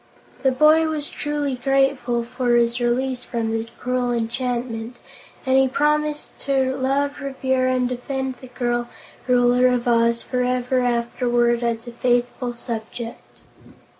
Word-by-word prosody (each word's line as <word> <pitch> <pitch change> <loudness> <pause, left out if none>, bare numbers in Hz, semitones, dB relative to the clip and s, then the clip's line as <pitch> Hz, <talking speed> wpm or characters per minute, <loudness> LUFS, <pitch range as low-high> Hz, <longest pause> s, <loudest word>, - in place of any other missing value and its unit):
The 265 - +3
boy 305 +4 +5
was 305 -2 -3
truly 295 -2 -2
grateful 270 -2 +1
for 245 0 0
his 235 0 +2
release 250 +1 0
from 230 -2 -2
the 225 0 -2
cruel 250 -1 -1
enchantment, 235 0 -2 0.5
and 260 0 +4
he 265 - +4
promised 300 +2 0
to 265 -1 0
love, 275 +2 0
revere 260 -1 0
and 255 -1 +1
defend 260 +1 -3
the 260 - -10
girl 240 -1 -2 0.4
Ruler 250 0 +4
of 250 -1 0
Oz 235 0 +3
forever 250 0 0
afterward, 240 0 +1
as 235 -1 -1
a 240 - -7
faithful 245 +1 0
subject. 235 0 -7
250 Hz, 135 wpm, -22 LUFS, 240-265 Hz, 0.5 s, boy